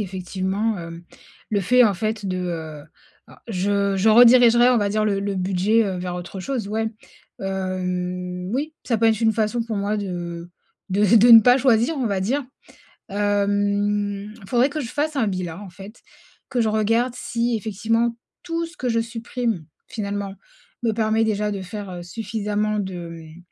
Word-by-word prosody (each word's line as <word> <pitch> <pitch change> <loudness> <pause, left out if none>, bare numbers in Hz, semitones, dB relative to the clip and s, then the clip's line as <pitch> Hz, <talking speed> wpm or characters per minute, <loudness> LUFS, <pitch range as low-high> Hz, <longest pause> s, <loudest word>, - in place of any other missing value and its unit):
effectivement, 190 +2 -2
hem. 170 0 -8 0.5
Le 205 -2 +1
fait 250 +6 +5
en 205 - +3
fait 215 +1 -3
de 185 -1 -2
heu 160 -4 -5 0.4
alors - - -18
je 200 -1 0
je 205 +4 +2
redirigerais 240 +1 +7
on 245 - +4
va 205 - +1
dire 215 +1 0
le 200 -2 0
le 200 0 -2
budget, 195 +4 +2
heu, 190 -2 -3
vers 180 0 -4
autre 180 +2 -7
chose 240 -1 -3
ouais. 220 +1 -1 0.5
Hem, 180 -1 -3
oui 300 +4 -2
ça 235 -3 +1
peut 225 - 0
être 220 -1 +2
une 225 -1 +3
façon 225 +2 0
pour 225 -2 -4
moi 200 +2 -1
de 175 -3 -5 0.4
de 200 +2 +1
v 210 +3 +5
de 240 +4 +6
ne 225 -1 +11
pas 250 +3 +5
choisir 245 +2 +3
on 250 - 0
va 200 -2 -1
dire. 260 +9 0 0.7
Hem, 205 0 0
faudrait 245 +4 +3
que 300 +1 -4
je 240 - -4
fasse 300 +1 -2
un 235 - +2
bilan 185 -2 -3
en 190 - -10
fait, 200 +5 -13 0.5
que 245 - 0
je 220 - +2
regarde 225 +3 +1
si 235 -1 -1
effectivement 225 +3 -1 0.3
tout 335 -1 -2
ce 335 - -15
que 255 - -3
je 230 - +1
supprime 230 -4 -3 0.2
finalement 200 -2 -4 0.5
me 230 -2 +1
permet 220 0 +1
déjà 210 -1 0
de 195 -2 -4
faire, 200 +1 -7
heu, 175 -1 -7
suffisamment 210 +1 -2
de 190 -1 -4 0.2
hem, 165 +1 -12
205 Hz, 180 wpm, -22 LUFS, 190-230 Hz, 0.7 s, ne